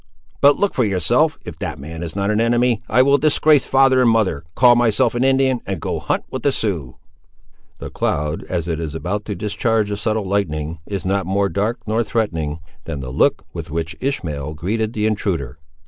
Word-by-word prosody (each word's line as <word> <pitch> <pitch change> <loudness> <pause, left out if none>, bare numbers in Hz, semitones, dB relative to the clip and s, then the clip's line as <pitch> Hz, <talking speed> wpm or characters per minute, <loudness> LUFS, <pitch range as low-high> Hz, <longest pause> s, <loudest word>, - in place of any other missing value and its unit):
But 140 0 +6
look 205 - +1
for 125 - +1
yourself: 115 - +2
if 80 -3 -8
that 75 -1 -4
man 80 +4 -8
is 85 -1 -5
not 100 +1 0
an 105 +1 +1
enemy, 120 0 +2
I 130 - +5
will 140 +1 +4
disgrace 150 -1 +3
father 135 -1 +4
and 125 - +5
mother, 100 -10 +1
call 120 0 +6
myself 115 -3 +3
an 120 +1 0
Indian, 130 -2 +2
and 95 -3 -3
go - - -3
hunt - - -1
with 130 - -4
the 140 - +2
Siouxes!" 85 - -2 0.8
The - - -8
cloud, 75 +2 -1
as 85 -2 -3
it 80 -2 -2
is 80 -2 -4
about 100 +6 -3
to 105 - -4
discharge 105 +2 0
the 100 - -2
subtle 110 0 -1
lightning, 85 -5 -2
is 100 -2 -4
not 95 -1 0
more 100 +1 +1
dark 105 +5 -1
nor 110 +2 +1
threatening, 80 -10 -2 0.3
than 75 -4 -5
the 65 -1 -6
look - - +2
with - - -6
which 80 0 -3
Ishmael 75 - -3
greeted 110 +7 -2
the 105 -2 -1
intruder. 85 - -2
100 Hz, 200 wpm, -20 LUFS, 80-120 Hz, 0.8 s, But